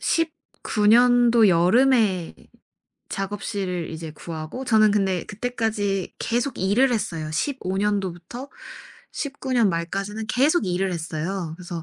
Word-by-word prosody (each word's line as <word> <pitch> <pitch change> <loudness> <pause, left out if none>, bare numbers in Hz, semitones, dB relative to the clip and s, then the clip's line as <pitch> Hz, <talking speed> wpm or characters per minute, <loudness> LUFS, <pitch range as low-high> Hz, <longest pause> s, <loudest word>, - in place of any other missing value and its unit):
19 305 -9 -1
년도 240 -1 +6
여름에 190 +1 +3 0.8
작업실을 195 -3 -3
이제 160 0 -6
구하고 160 +10 -7
저는 215 -3 +4
근데 195 -4 0
그때까지 215 -4 -2
계속 240 +3 -1
일을 225 +8 +3
했어요. 165 -9 -2
15 190 - -2
년도부터 200 +4 -3 0.6
19 280 -2 -4
년 235 -4 +4
말까지는 195 +6 -3
계속 270 - +2
일을 185 +1 0
했어요. 165 +1 -4
그래서 175 -2 -7
205 Hz, 245 characters per minute, -23 LUFS, 180-240 Hz, 0.8 s, 년도